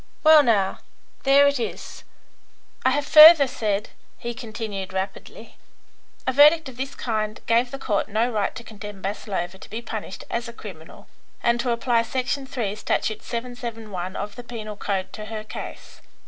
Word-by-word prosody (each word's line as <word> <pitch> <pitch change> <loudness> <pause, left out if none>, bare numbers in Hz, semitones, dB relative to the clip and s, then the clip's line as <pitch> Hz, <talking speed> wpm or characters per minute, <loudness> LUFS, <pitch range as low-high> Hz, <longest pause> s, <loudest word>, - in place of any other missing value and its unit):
Well, 310 -1 +8
now, 210 -8 +1 0.5
there 275 +1 +6
it 280 -2 +1
is. 235 - -6 0.8
I 260 - +4
have 285 +2 0
further 305 0 +10
said," 215 -5 -2 0.3
he 240 0 -5
continued, 220 -5 -6
rapidly, 190 +1 -6 0.7
"a 260 - 0
verdict 300 +3 +6
of 250 - -13
this 270 +2 -4
kind 215 -2 -2
gave 235 +2 +2
the 275 - -6
Court 215 -7 -1
no 225 +4 +1
right 210 -3 -1
to 235 - -8
condemn 210 -2 -9
Maslova 190 -2 -4
to - - -13
be 225 - -4
punished 220 -4 -7
as 235 +1 -3
a 235 - -8
criminal, 180 -8 -11 0.4
and 235 0 +2
to 245 - -1
apply 235 0 +2
section 265 +3 -2
3, 230 -7 -3
statute 215 0 -1
771 225 -6 -5
of 205 0 -5
the 245 - -7
penal 220 -3 -7
code 195 -2 -3
to 215 - -7
her 215 0 -6
case. 215 - -9
230 Hz, 165 wpm, -24 LUFS, 210-255 Hz, 0.8 s, further